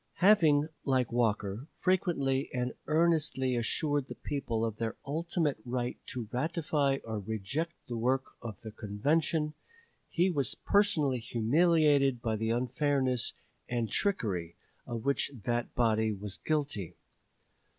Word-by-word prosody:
Having, 160 Hz, -7 st, +5 dB
like 130 Hz, -4 st, +1 dB
Walker, 110 Hz, 0 st, 0 dB
frequently 150 Hz, -8 st, +1 dB
and 125 Hz, 0 st, -1 dB
earnestly 155 Hz, -5 st, +2 dB
assured 145 Hz, +4 st, 0 dB
the -, -, -7 dB
people 120 Hz, -6 st, -2 dB
of 110 Hz, -2 st, -3 dB
their 115 Hz, -1 st, -2 dB
ultimate 160 Hz, -2 st, -1 dB
right 125 Hz, 0 st, -2 dB
to 120 Hz, -4 st, -4 dB
ratify 145 Hz, -1 st, +1 dB
or 110 Hz, -2 st, -3 dB
reject 110 Hz, -, -3 dB
the 120 Hz, -, -4 dB
work 130 Hz, +3 st, 0 dB
of 110 Hz, -5 st, -7 dB
the 110 Hz, -, -7 dB
convention, 150 Hz, +9 st, 0 dB, 0.6 s
he 180 Hz, +3 st, +2 dB
was 140 Hz, -7 st, 0 dB
personally 165 Hz, -11 st, +2 dB
humiliated 140 Hz, +3 st, +3 dB
by 115 Hz, -2 st, -1 dB
the 110 Hz, +1 st, -1 dB
unfairness 130 Hz, +1 st, +1 dB, 0.4 s
and 120 Hz, -3 st, -1 dB
trickery 95 Hz, -, 0 dB, 0.3 s
of 115 Hz, -2 st, -4 dB
which 140 Hz, 0 st, +2 dB
that 120 Hz, 0 st, -1 dB
body 110 Hz, -2 st, +2 dB
was 100 Hz, -1 st, -5 dB
guilty. 140 Hz, -, -2 dB
130 Hz, 125 wpm, -31 LUFS, 115-150 Hz, 0.6 s, Having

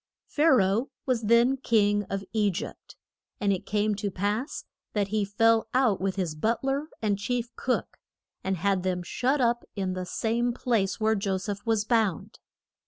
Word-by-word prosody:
Pha 300 Hz, -, 0 dB
ra 210 Hz, -7 st, +5 dB
oh 220 Hz, +8 st, 0 dB, 0.2 s
was 255 Hz, -3 st, +1 dB
then 235 Hz, +4 st, +4 dB
king 205 Hz, -5 st, +2 dB
of 195 Hz, 0 st, -4 dB
E 210 Hz, -2 st, +3 dB
gypt. 185 Hz, 0 st, -6 dB, 0.4 s
And 200 Hz, -1 st, +2 dB
it 185 Hz, -, -5 dB
came 210 Hz, +1 st, +1 dB
to 205 Hz, 0 st, -2 dB
pass 205 Hz, -, -2 dB, 0.3 s
that 205 Hz, -2 st, 0 dB
he 215 Hz, 0 st, +1 dB
fell 225 Hz, +3 st, +3 dB
out 245 Hz, -8 st, +3 dB
with 190 Hz, 0 st, -1 dB
his 180 Hz, -5 st, -2 dB
but 220 Hz, +12 st, -1 dB
ler 275 Hz, +3 st, -1 dB, 0.2 s
and 205 Hz, -2 st, +1 dB
chief 240 Hz, +2 st, -2 dB
cook, 255 Hz, -, -2 dB, 0.5 s
and 190 Hz, 0 st, -1 dB
had 195 Hz, +2 st, +1 dB
them 180 Hz, -1 st, -1 dB
shut 260 Hz, +10 st, 0 dB
up 240 Hz, -1 st, +2 dB
in 190 Hz, -2 st, -2 dB
the 185 Hz, -1 st, -4 dB
same 235 Hz, +4 st, 0 dB
place 230 Hz, -6 st, 0 dB
where 220 Hz, 0 st, +3 dB
Jo 195 Hz, -2 st, 0 dB
seph 205 Hz, +1 st, -5 dB
was 220 Hz, -2 st, +2 dB
bound. 220 Hz, -7 st, 0 dB
210 Hz, 180 wpm, -27 LUFS, 195-235 Hz, 0.5 s, ra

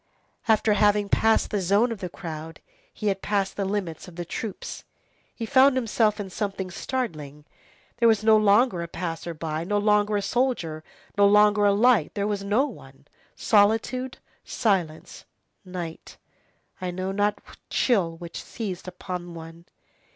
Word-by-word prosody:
After 220 Hz, -1 st, +3 dB
having 205 Hz, 0 st, +3 dB
passed 225 Hz, +2 st, +2 dB
the 205 Hz, -, 0 dB
zone 200 Hz, +6 st, +2 dB
of 225 Hz, -, -5 dB
the 180 Hz, -3 st, -5 dB
crowd, 165 Hz, -2 st, -8 dB, 0.3 s
he 215 Hz, -, -8 dB
had 195 Hz, -1 st, -2 dB
passed 200 Hz, -2 st, -1 dB
the 200 Hz, -, -2 dB
limits 190 Hz, -4 st, -3 dB
of 180 Hz, -, -12 dB
the 175 Hz, 0 st, -5 dB
troops; 210 Hz, +4 st, -6 dB, 0.5 s
he 230 Hz, -, -4 dB
found 265 Hz, +2 st, +5 dB
himself 220 Hz, -3 st, +1 dB
in 195 Hz, -2 st, -5 dB
something 195 Hz, -2 st, -3 dB
startling. 155 Hz, -, -4 dB, 0.5 s
There 235 Hz, -1 st, +4 dB
was 220 Hz, -2 st, +3 dB
no 220 Hz, 0 st, +6 dB
longer 215 Hz, -2 st, +4 dB
a 170 Hz, -, -4 dB
passer 165 Hz, -1 st, -5 dB
by, 155 Hz, 0 st, -3 dB
no 205 Hz, +4 st, 0 dB
longer 210 Hz, 0 st, +2 dB
a 200 Hz, -, -2 dB
soldier, 195 Hz, -9 st, -1 dB, 0.4 s
no 200 Hz, -, +7 dB
longer 210 Hz, 0 st, +5 dB
a 200 Hz, -, +5 dB
light, 215 Hz, -4 st, +3 dB
there 200 Hz, -1 st, -1 dB
was 205 Hz, -1 st, -2 dB
no 210 Hz, +8 st, +2 dB
one; -, -, -12 dB, 0.3 s
solitude, 225 Hz, +5 st, +2 dB, 0.3 s
silence, 180 Hz, -8 st, -2 dB, 0.4 s
night, 180 Hz, -3 st, -7 dB, 0.6 s
I 185 Hz, -, -2 dB
know 185 Hz, +2 st, -3 dB
not 205 Hz, +1 st, +1 dB
what -, -, -16 dB
chill 180 Hz, -10 st, +1 dB
which 170 Hz, 0 st, -8 dB
seized 190 Hz, -6 st, -6 dB
hold 180 Hz, -, -8 dB
upon 175 Hz, -2 st, -6 dB
one. 165 Hz, +1 st, -11 dB
200 Hz, 160 wpm, -25 LUFS, 175-215 Hz, 0.6 s, no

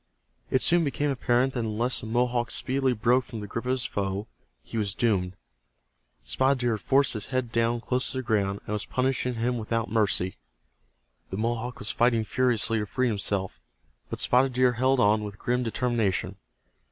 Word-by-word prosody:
It 130 Hz, -, +3 dB
soon 175 Hz, 0 st, +4 dB
became 145 Hz, 0 st, -1 dB
apparent 125 Hz, 0 st, +1 dB
that 125 Hz, -, -2 dB
unless 115 Hz, +2 st, 0 dB
the -, -, -8 dB
Mohawk 120 Hz, 0 st, 0 dB
speedily 130 Hz, +1 st, 0 dB
broke 120 Hz, +3 st, +2 dB
from 115 Hz, -3 st, -8 dB
the 105 Hz, -, -6 dB
grip 115 Hz, +4 st, -5 dB
of 130 Hz, -, +2 dB
his 130 Hz, -1 st, -1 dB
foe 100 Hz, -1 st, -2 dB, 0.4 s
he -, -, -10 dB
was 100 Hz, -1 st, -1 dB
doomed. 95 Hz, -6 st, 0 dB, 0.9 s
Spotted 130 Hz, -, +2 dB
Deer 120 Hz, -3 st, 0 dB
had -, -, -18 dB
forced 140 Hz, 0 st, +4 dB
his 110 Hz, -3 st, -3 dB
head 130 Hz, -3 st, -2 dB
down 115 Hz, +1 st, +1 dB
close 125 Hz, +2 st, +1 dB
to -, -, -4 dB
the 130 Hz, -, -2 dB
ground, 100 Hz, -4 st, 0 dB
and 105 Hz, -, -4 dB
was 105 Hz, -, -1 dB
punishing 125 Hz, -1 st, -1 dB
him 120 Hz, +1 st, -1 dB
without 115 Hz, 0 st, -2 dB
mercy. 100 Hz, -4 st, +1 dB, 0.9 s
The 95 Hz, -, -5 dB
Mohawk 120 Hz, +2 st, -2 dB
was 105 Hz, -, -4 dB
fighting 120 Hz, -2 st, +2 dB
furiously 115 Hz, -1 st, +2 dB
to 105 Hz, -, -3 dB
free 130 Hz, +4 st, 0 dB
himself, 100 Hz, -3 st, -2 dB, 0.5 s
but -, -, -4 dB
Spotted 130 Hz, +1 st, +3 dB
Deer 125 Hz, 0 st, +3 dB
held 130 Hz, +2 st, +2 dB
on 105 Hz, -1 st, +3 dB
with 105 Hz, -1 st, -7 dB
grim 125 Hz, +3 st, -1 dB
determination. 115 Hz, -4 st, -1 dB
120 Hz, 185 wpm, -27 LUFS, 105-125 Hz, 0.9 s, soon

